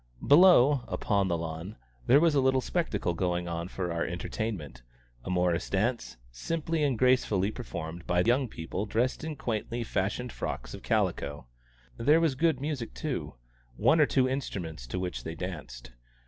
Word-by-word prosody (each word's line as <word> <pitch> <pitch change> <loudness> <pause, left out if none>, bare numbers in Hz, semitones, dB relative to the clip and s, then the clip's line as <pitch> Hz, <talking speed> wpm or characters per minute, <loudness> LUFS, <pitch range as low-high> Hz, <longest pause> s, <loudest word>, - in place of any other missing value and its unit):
Below, 145 -4 +7
upon 100 -3 0
the 85 -2 0
lawn, 80 +4 -6 0.3
there 135 +4 +7
was 165 -1 +4
a 140 - +3
little 130 0 +3
spectacle 125 - -1
going 90 0 -1
on 85 0 -3
for 90 -2 -3
our 85 - -1
entertainment 85 - -4 0.4
a - - -6
morris 90 -2 +1
dance, 115 - -1
simply 160 - -2
and 135 -5 +1
gracefully 110 -6 +2
performed 85 -8 -7
by 90 0 +3
young 125 +6 +2
people 95 +2 -5
dressed 120 +8 0
in 155 -1 -4
quaintly 120 -2 -3
fashioned 105 +4 -2
frocks - - -5
of - - -8
calico; 75 -3 -1 0.5
there 145 +7 +4
was 165 -4 +2
good 155 0 +1
music 140 - -4
too - - -4 0.4
one 160 - +4
or 150 - +5
two 130 -1 +2
instruments, 90 - -4
to - - -4
which 90 -1 -3
they 80 - -5
danced. 75 -10 -7
105 Hz, 160 wpm, -29 LUFS, 85-130 Hz, 0.5 s, Below